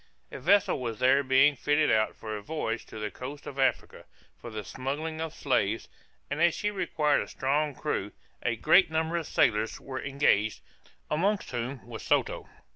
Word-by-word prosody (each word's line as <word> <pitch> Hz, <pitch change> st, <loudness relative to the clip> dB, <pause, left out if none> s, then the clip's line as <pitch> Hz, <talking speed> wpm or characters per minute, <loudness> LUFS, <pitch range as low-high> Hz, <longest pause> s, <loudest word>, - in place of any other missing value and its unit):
A -, -, -7 dB
vessel 195 Hz, +1 st, +3 dB
was 115 Hz, -3 st, -4 dB
there 130 Hz, +4 st, +4 dB
being 135 Hz, +2 st, +4 dB
fitted 150 Hz, +3 st, +2 dB
out 110 Hz, -1 st, +2 dB
for 110 Hz, -1 st, -6 dB
a 105 Hz, -, -5 dB
voyage 115 Hz, -2 st, -3 dB
to -, -, -10 dB
the 105 Hz, -1 st, -4 dB
coast 140 Hz, +3 st, -8 dB
of 140 Hz, -, -7 dB
Africa, 135 Hz, -, 0 dB, 0.3 s
for 120 Hz, -, -10 dB
the 110 Hz, -2 st, -5 dB
smuggling 145 Hz, -, -4 dB
of 160 Hz, -1 st, -3 dB
slaves; 115 Hz, -8 st, 0 dB, 0.4 s
and 145 Hz, +3 st, -3 dB
as 170 Hz, -1 st, +4 dB
she 210 Hz, -, -1 dB
required 160 Hz, -7 st, +1 dB
a -, -, -5 dB
strong 145 Hz, +2 st, 0 dB
crew, 105 Hz, -9 st, -2 dB, 0.3 s
a 120 Hz, -, 0 dB
great 175 Hz, -, +5 dB
number 160 Hz, +1 st, -1 dB
of 165 Hz, -, -3 dB
sailors 110 Hz, 0 st, +1 dB
were 130 Hz, -1 st, -6 dB
engaged, 135 Hz, -6 st, +1 dB, 0.5 s
amongst 195 Hz, +7 st, 0 dB
whom 125 Hz, +1 st, -4 dB
was 115 Hz, -1 st, -8 dB
Soto. -, -, 0 dB
135 Hz, 180 wpm, -28 LUFS, 115-155 Hz, 0.5 s, great